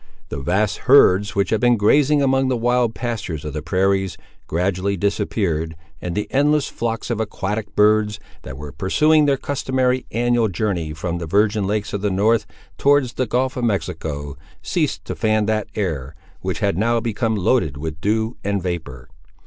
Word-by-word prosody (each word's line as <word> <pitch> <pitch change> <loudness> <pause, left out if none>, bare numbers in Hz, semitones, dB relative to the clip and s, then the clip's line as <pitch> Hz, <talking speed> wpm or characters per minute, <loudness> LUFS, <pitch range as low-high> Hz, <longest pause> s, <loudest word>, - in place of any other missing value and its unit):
The 70 - -4
vast 95 +8 0
herds 105 -7 +6
which 100 0 +1
had 110 - +1
been 120 -1 +4
grazing 140 +7 +4
among 135 0 +2
the 130 -1 +1
wild 120 0 +1
pastures 105 - -4
of 75 - -5
the 75 - -3
prairies, 95 +1 0 0.3
gradually 95 +3 -1
disappeared, 95 -5 -1 0.3
and 90 -1 -4
the 105 - -2
endless 145 +1 +2
flocks 115 +1 -3
of 115 - -1
aquatic 105 0 -3
birds, 105 0 +3 0.2
that 65 - -8
were 75 0 -8
pursuing 150 - +3
their 140 -1 +3
customary 130 -2 -1
annual 120 0 +2
journey 90 -5 -2
from 85 +1 -3
the 85 - -5
virgin 105 +2 +2
lakes 105 0 -2
of 100 - -2
the 105 - +1
north 110 +4 +2 0.3
towards 140 -3 +3
the 130 - -1
gulf 130 +3 0
of 125 - -3
Mexico, 80 - -2 0.3
ceased - - -1
to - - -4
fan 110 -1 +1
that 110 0 0
air, 80 -8 -3 0.2
which - - -4
had 85 - +1
now 115 +2 +2
become 115 0 -1
loaded 90 - +1
with 80 +1 -6
dew 110 +2 0
and 100 -2 -1
vapour. 80 -8 -5
105 Hz, 175 wpm, -21 LUFS, 90-120 Hz, 0.3 s, herds